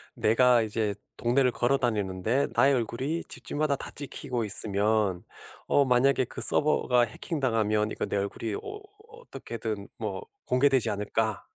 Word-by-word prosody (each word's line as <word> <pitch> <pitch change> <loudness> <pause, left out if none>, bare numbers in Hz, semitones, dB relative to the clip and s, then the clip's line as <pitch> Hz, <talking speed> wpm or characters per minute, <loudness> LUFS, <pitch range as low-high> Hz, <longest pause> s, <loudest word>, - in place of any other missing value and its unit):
'내가 120 +2 +4
이제 110 -1 -1 0.2
동네를 125 +2 +2
걸어 120 +3 +1
다니는데 110 +1 0
나의 140 +1 +4
얼굴이 130 +7 -2
집집마다 150 -1 -1
다 - - -7
찍히고 130 -4 -4
있으면 105 -2 0 0.4
어 140 - +4
만약에 130 +1 +3
그 - - -10
서버가 130 -4 +3
해킹당하면 110 -4 0
이거 - - -3
내 - - -4
얼굴이 100 +2 -3
어 415 - -7 0.3
어떻게든 475 +2 -7
뭐 455 - -5 0.2
공개되지 130 -1 +3
않을까?' 105 0 -2
120 Hz, 315 characters per minute, -27 LUFS, 105-135 Hz, 0.4 s, 내가